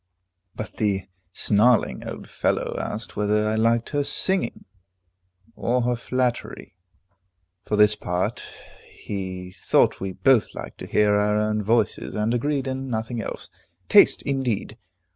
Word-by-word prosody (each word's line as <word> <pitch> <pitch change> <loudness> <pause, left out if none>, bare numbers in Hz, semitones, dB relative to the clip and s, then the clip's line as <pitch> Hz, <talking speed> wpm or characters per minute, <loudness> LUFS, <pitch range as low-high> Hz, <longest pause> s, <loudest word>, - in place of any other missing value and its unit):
But 110 - -7
the 100 -3 0 0.3
snarling 110 +4 +2
old - - -7
fellow - - -1
asked 110 +3 -5
whether 105 +1 +1
I 110 - 0
liked 115 +1 +2
her 145 -1 0
singing, 165 0 -1 0.9
or 125 +1 0
her 125 0 +1
flattery? 125 -4 -3 0.9
For 105 - -1
his 105 0 +6
part, 90 -2 -2 0.5
he 95 -2 -6
thought 95 - +2
we 95 -1 -4
both 130 +2 +3
liked - - -8
to - - -7
hear 105 -1 +3
our 105 0 +2
own 105 0 0
voices, 110 +1 0
and 105 +2 0
agreed 140 +3 0
in 130 0 -4
nothing 115 0 -3
else. - - -7 0.4
Taste, - - +6
indeed! 125 -6 -2
110 Hz, 135 wpm, -24 LUFS, 105-125 Hz, 0.9 s, his